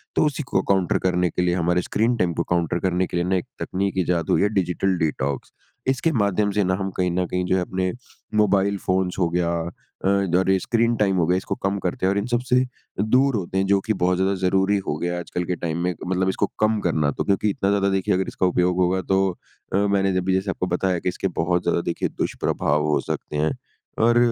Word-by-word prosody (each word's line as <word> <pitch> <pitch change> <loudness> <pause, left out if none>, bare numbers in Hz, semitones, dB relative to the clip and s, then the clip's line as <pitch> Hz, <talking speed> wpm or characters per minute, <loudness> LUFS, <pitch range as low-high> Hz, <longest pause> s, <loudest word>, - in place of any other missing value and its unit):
तो - - +3
उसी 150 0 -1
को 95 - 0
काउंटर 95 -3 +2
करने 90 -1 +2
के 90 - -2
लिए 90 0 +1
हमारे 90 0 +1
स्क्रीन 115 +6 +1
टाइम 90 -4 +1
को 85 - -1
काउंटर 85 0 +1
करने 90 0 0
के 90 - -3
लिए 85 - +1
ना 95 +1 +1
एक 90 - -1
तकनीक 95 +1 -2
इजात 85 -2 0
हुई - - +3
है 100 - +3
डिजिटल 95 0 0
डिटॉक्स। 70 -4 -2 0.4
इसके 135 +5 +1
माध्यम 105 - +1
से 105 0 +1
ना 95 0 +1
हम 95 - -2
कहीं 90 -1 +1
न 90 +1 0
कहीं 90 +1 -1
जो 95 - +1
है 95 - +1
अपने 95 +1 -1 0.4
मोबाइल 100 -1 +3
फ़ोन्स 95 0 0
हो 85 -2 +2
गया 85 0 0 0.6
अ, - - +3 0.2
द 90 -1 -1
और 95 +1 +2
ये 95 - +4
स्क्रीन 115 +3 +1
टाइम 100 -3 +2
हो 85 - +3
गया 90 +1 +3
इसको 95 - -3
कम 95 +1 +1
करते 90 0 -2
हैं 95 - +3
और 100 - 0
इन 100 - 0
सबसे 125 +1 0 0.5
दूर 130 +4 +3
होते 95 -1 -3
हैं 95 - +2
जो 100 0 +4
कि 110 - -1
बहुत 90 0 +3
ज़्यादा 95 +1 +1
ज़रूरी 95 +2 +2
हो 75 - -1
गया 85 +3 -2
है 90 - -2
आजकल 90 0 -4
के 90 - -1
टाइम 85 -1 -3
में 90 0 0
मतलब 95 +1 +1
इसको - - +1
कम 110 0 +2
करना। 75 -4 +1
तो - - -3
क्योंकि 100 +2 +1
इतना 100 0 0
ज़्यादा 100 -1 +2
देखिए 95 -1 +1
अगर 95 0 0
इसका 95 - -1
उपयोग 90 0 +2
होगा 95 +1 +2
तो 95 0 +2 0.4
अ, - - +3
मैंने 100 -2 +2
अभी 95 +1 0
जैसे 95 +1 0
आपको 90 - -3
बताया 90 -1 0
कि 90 - -1
इसके 95 - -2
बहुत 85 +1 +1
ज़्यादा 85 - +1
देखिए 85 - -2
दुष्प्रभाव 75 +1 -1
हो 75 - +2
सकते 75 - -4
हैं। 80 +1 +1 0.5
और 120 +1 +4
95 Hz, 240 wpm, -23 LUFS, 90-100 Hz, 0.6 s, ये